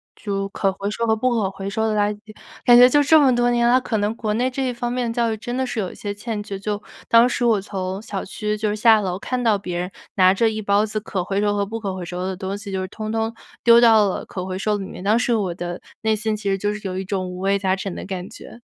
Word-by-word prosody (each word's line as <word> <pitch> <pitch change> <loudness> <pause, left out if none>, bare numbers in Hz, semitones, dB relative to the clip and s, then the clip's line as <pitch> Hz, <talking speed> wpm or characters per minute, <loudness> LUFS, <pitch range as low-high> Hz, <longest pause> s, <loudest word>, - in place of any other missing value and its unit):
就 195 -2 -3
可 195 -1 0
回 200 +1 -4
收 230 +2 -2
和 220 -1 +2
不 255 +3 +1
可 215 -5 0
回 195 0 -6
收 220 +2 -1
的 220 - 0
垃 205 0 +3
圾。 215 +1 -14 0.3
感 240 -1 +7
觉 245 +1 +9
就 290 +3 +4
这 315 +2 +6
么 270 -3 +5
多 240 0 +2
年 240 0 +2
了， 250 +2 +5
可 225 - -2
能 210 +2 -1
国 215 -2 -2
内 250 +3 +1
这 260 +1 -2
一 - - 0
方 240 0 -3
面 245 -2 -1
的 - - -4
教 235 -2 +1
育 - - -1
真 240 +3 -5
的 260 - 0
是 245 -2 -4
有 190 -4 -2
一 - - -13
些 205 -1 -5
欠 210 +1 -4
缺。 200 -1 -6
就 205 +1 -3 0.3
当 230 +1 +6
时 250 - -2
我 225 -3 +3
从 190 -1 -4
小 200 -3 -5
区 210 +1 -3
就 215 0 -1
是 205 - -1
下 220 0 +5
楼， 185 -2 -2
看 250 +4 -3
到 225 -4 +3
别 180 -3 -5
人 180 +1 -4 0.2
拿 185 -1 +5
着 225 +3 +2
一 215 0 -4
包 200 +1 +2
子 215 0 -3
可 200 -3 -3
回 195 +2 -1
收 205 0 +1
和 200 0 0
不 225 +3 -5
可 200 -3 -3
回 185 -1 -6
收 180 +1 -5
的 190 0 -3
东 190 +1 -4
西， 205 -1 -8
就 190 -1 -2
是 185 - -4
统 215 +2 -6
统 225 0 -1 0.3
丢 235 0 +7
到 220 -3 +6
了 190 - -3
可 185 -1 -6
回 185 0 -4
收 210 +2 0
里 195 - -5
面， - - -9
当 210 +3 +3
时 245 -1 +1
我 195 -5 -1
的 175 0 -5 0.2
内 220 -1 +2
心 215 0 -1
其 205 -1 -3
实 195 - +1
就 205 +2 -1
是 210 - -6
有 185 0 -4
一 - - -3
种 190 -1 -2
五 180 0 -7
味 195 +1 +1
杂 190 -1 +1
陈 195 -1 -5
的 - - -6
感 185 -1 -5
觉。 235 +1 -12
210 Hz, 325 characters per minute, -22 LUFS, 195-230 Hz, 0.3 s, 觉